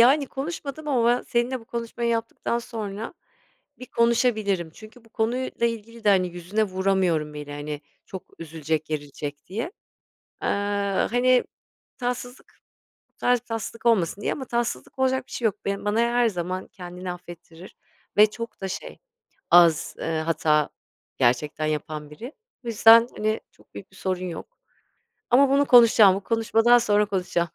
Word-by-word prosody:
Yani, 275 +4 +5
konuşmadım 295 +1 -6
ama 245 -5 +2
ben 245 +1 +2
seninle 240 +1 -1
bu - - -16
konuşmayı 235 0 -4
yaptıktan 230 +1 -2
sonra 220 - -6 0.6
bir 255 - -9
konuşabilirim. 220 -7 +1
Çünkü 225 +2 -14
bu - - -20
konuyla 235 +2 -1
ilgili 230 0 -6
de, - - +3
hani, 185 -2 +3
yüzüne 180 +5 -2
vuramıyorum 185 -6 0
bile. 150 -1 -7
Hani, 145 0 -5 0.3
çok 190 - -7 0.2
üzülecek, 160 -1 -3
gerilecek 145 -1 -6
diye, 230 - -4 0.7
ııı, 200 -1 0
hani, 250 +1 +4 0.5
tatsızlık, 245 0 -5 0.5
bu - - -48
tarz 245 -1 +2
bir - - -41
tatsızlık 225 0 -5
olmasın 200 -4 +2
diye. - - 0
Ama 270 - -5
tatsızlık 235 - -3
olacak 260 0 +1
bir - - -14
şey 235 - -1
yok. 210 - 0
Bana 205 +2 0
her 235 0 +3
zaman 185 -1 -4
kendini 180 -3 -7
affettirir 175 0 -12 0.4
ve 210 +1 +7
çok 230 +1 -8
da 195 - -3
şey, 190 - -7 0.5
az 170 -3 +5
hata 155 -2 +1 0.5
gerçekten 135 +5 +1
yapan 150 0 -4
biri. 230 - -9 0.3
Bu - - -6
yüzden, 230 +1 +7
hani, 215 +1 -1
çok - - -26
büyük 195 - -10
bir - - -18
sorun 185 -1 -2
yok 185 - -8 0.7
ama 270 +3 +6
bunu 280 +1 +3
konuşacağım. 225 -5 +7
Bu 195 - -4
konuşmadan 225 +2 +3
sonra 210 -3 +2
konuşacağım. 180 -3 -1
210 Hz, 150 wpm, -24 LUFS, 175-235 Hz, 0.7 s, ve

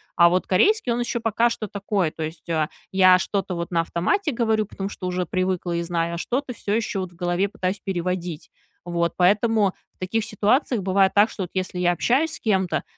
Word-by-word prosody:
А 170 -1 +6
вот 185 +1 0
корейский, 270 - +3
он 235 - 0
еще 240 0 -2
пока 230 +1 +2
что 215 -2 -4
такое, 200 -3 -1
то 160 - -6
есть, 160 +2 -7
а, 155 -2 0 0.2
я 185 -1 +6
что-то 195 -1 -2
вот 170 -1 -4
на 170 -2 +1
автомате 290 - 0
говорю, 220 -3 +1
потому 195 -1 -5
что 185 - -8
уже 180 0 -1
привыкла 185 -1 -1
и 170 - 0
знаю, 170 0 -1
а - - -5
что-то 250 +6 -2
всё 205 -2 -3
еще 215 -3 -1
вот 185 -1 -4
в - - -20
голове 175 +3 0
пытаюсь 190 +1 -3
переводить. 175 -4 -3 0.4
Вот. 170 -1 -1
Поэтому 205 +2 +3 0.2
в - - -45
таких 210 +4 -1
ситуациях 220 +2 +1
бывает 190 0 +2
так, 205 +2 +5
что 195 - -5
вот, 175 - -7
если 185 -1 -3
я 175 0 +3
общаюсь 280 - +1
с - - -6
кем-то, 190 -5 0
190 Hz, 215 wpm, -23 LUFS, 175-215 Hz, 0.4 s, А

